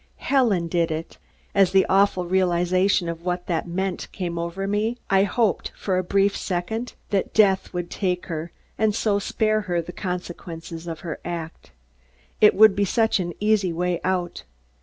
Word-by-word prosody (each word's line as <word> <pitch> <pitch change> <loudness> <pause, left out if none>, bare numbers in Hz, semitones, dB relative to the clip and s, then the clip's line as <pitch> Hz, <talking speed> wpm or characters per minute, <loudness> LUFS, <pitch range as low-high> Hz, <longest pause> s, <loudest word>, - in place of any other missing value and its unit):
Helen 225 -11 +2
did 170 0 +1
it! 160 +1 -5 0.3
As 195 -2 +4
the 190 -1 +5
awful 195 -2 +3
realization 185 +1 +2
of 170 0 -5
what 180 0 -2
that 170 -1 -2
meant 190 +2 -3
came 175 -3 -4
over 170 +3 -3
me, 215 +4 0
I 195 0 +5
hoped, 210 -3 0
for 185 -2 0
a - - -1
brief 195 +2 +2
second, 205 +7 -3 0.2
that 195 -2 -1
death 195 -3 +3
would 175 -1 -4
take 180 -3 -1
her 165 -1 -5 0.3
and 215 -2 +2
so 210 -3 +1
spare 215 +1 0
her 175 -1 +1
the 170 +1 -5
consequences 175 -2 -6
of 165 -2 -6
her 165 -4 -5
act. 170 -2 -6 0.7
It 210 - +7
would 215 -1 +7
be 200 - +1
such 225 +2 +2
an 175 -2 -3
easy 210 -3 +2
way 175 +1 -1
out. 180 -2 -2
185 Hz, 170 wpm, -24 LUFS, 175-200 Hz, 0.7 s, It